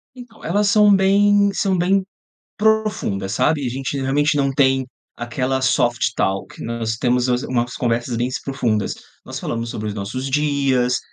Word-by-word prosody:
Então, 245 -3 -13
elas 205 +4 +1
são 210 -1 +5
bem 200 +1 +4
são 195 -1 0
bem 190 +2 +2 0.5
profundas, 210 - 0
sabe, 145 +2 +1
a - - 0
gente 135 +2 -3
realmente 145 +3 +1
não 135 -1 +1
tem 135 -1 +2 0.3
aquela 130 +3 -2
Soft 120 -2 +1
Talk 95 0 -2
nós 115 -1 -3
temos 125 +1 +1
umas 125 +1 +1
umas 120 -1 -1
conversas 120 0 -1
bens 125 +2 -2
profundas, 120 -6 -1 0.3
nós - - -6
falamos 115 0 -4
sobre 105 0 -4
os 105 - -4
nossos 130 +7 -4
dias, 135 -3 +1
130 Hz, 155 wpm, -20 LUFS, 120-180 Hz, 0.5 s, são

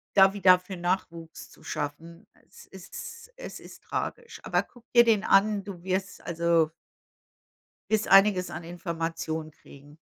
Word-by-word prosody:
da 195 -1 +7
wieder 185 -2 +5
für 185 +1 -9
Nachwuchs 175 -2 -4
zu - - -19
schaffen. 165 +5 -6 0.2
Es - - -16
ist 190 - -10
es - - -8
ist - - -14
tragisch. 470 -1 -5
Aber - - +1
guck 245 -2 -21
dir 240 -1 +8
den 220 -3 +3
an, 205 0 +3
du 185 -4 -9
wirst, 190 0 -3
also 170 -1 +1 1.2
wirst 220 -1 +1
einiges 195 -2 +5
an 165 +2 -6
Informationen 165 -2 -4
kriegen. 145 0 -17
180 Hz, 140 wpm, -27 LUFS, 165-195 Hz, 1.2 s, dir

